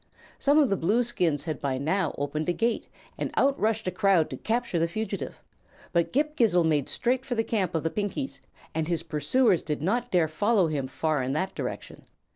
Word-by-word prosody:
Some 285 +2 +4
of 285 -7 +4
the 195 - +2
Blueskins 180 - +1
had 155 -3 -4
by 135 -2 -1
now 160 +4 0
opened 150 +3 -2
a - - +2
gate, 230 +4 0 0.3
and - - -1
out 275 0 +2
rushed 220 +1 0
a 185 - 0
crowd 185 -2 +3
to - - -4
capture 235 -5 -1
the 165 - +2
fugitive; 200 +2 -5 0.5
but 170 -1 +2
Ghip 300 +3 +1
Ghisizzle 180 - +3
made 150 -4 +1
straight 255 +2 0
for 260 -2 -3
the 225 - +1
camp 195 -7 -1
of 160 - 0
the 165 - 0
Pinkies 210 +7 -3 0.3
and 160 0 -1
his 170 -2 -1
pursuers 175 - +2
did 150 -1 -3
not 240 +7 0
dare 175 -6 +3
follow 205 +5 +2
him 140 -4 -2
far 155 +2 -1
in 130 +1 -1
that 185 +6 -1
direction. - - -6
185 Hz, 205 wpm, -27 LUFS, 155-230 Hz, 0.5 s, Some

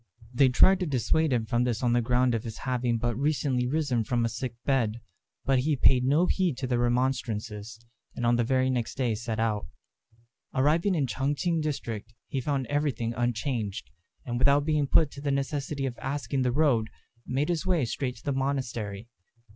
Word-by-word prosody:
They 130 +1 +5
tried 190 +9 +5
to 180 - -1
dissuade 150 +3 +1
him 120 -3 +1
from 120 +2 +1
this 120 -1 -1
on 120 -1 +3
the 120 - +3
ground 125 +1 +2
of 115 -1 -1
his 115 -3 -6
having 125 -2 -1
but 120 0 -1
recently 135 -2 0
risen 135 -5 0
from 120 +1 0
a - - 0
sick 120 +1 -5
bed; 120 -5 +1 0.5
but 135 -1 +3
he 150 +4 +1
paid 130 -1 +4
no 150 +7 +3
heed 180 -8 0
to 135 - -3
their 125 -1 0
remonstrances, 115 -3 -1 0.4
and 120 - -2
on 120 0 +4
the 120 - +2
very 130 +2 +2
next 120 -3 -2
day 125 -4 +1
set 110 0 -4
out. 110 -2 0 0.9
Arriving 160 +8 +2
in 150 - +1
the 125 - -4
Ch'ang 140 +2 0
ch'ing 165 +2 0
district, 115 -7 -4
he 135 - -2
found 135 0 -1
everything 130 -4 -1
unchanged; 115 - -2 0.3
and 120 -1 -2
without 140 +2 +4
being 150 -2 +1
put 150 +1 +4
to 140 - -9
the 145 - -2
necessity 140 0 -2
of 125 -2 -4
asking 140 0 -2
the 125 -1 +1
road, 125 -6 +2 0.4
made 140 +5 0
his 175 +1 -1
way 170 -8 +2
straight 125 +2 -3
to 115 - -16
the 140 - -1
monastery. 120 -6 -3
130 Hz, 195 wpm, -28 LUFS, 120-140 Hz, 0.9 s, They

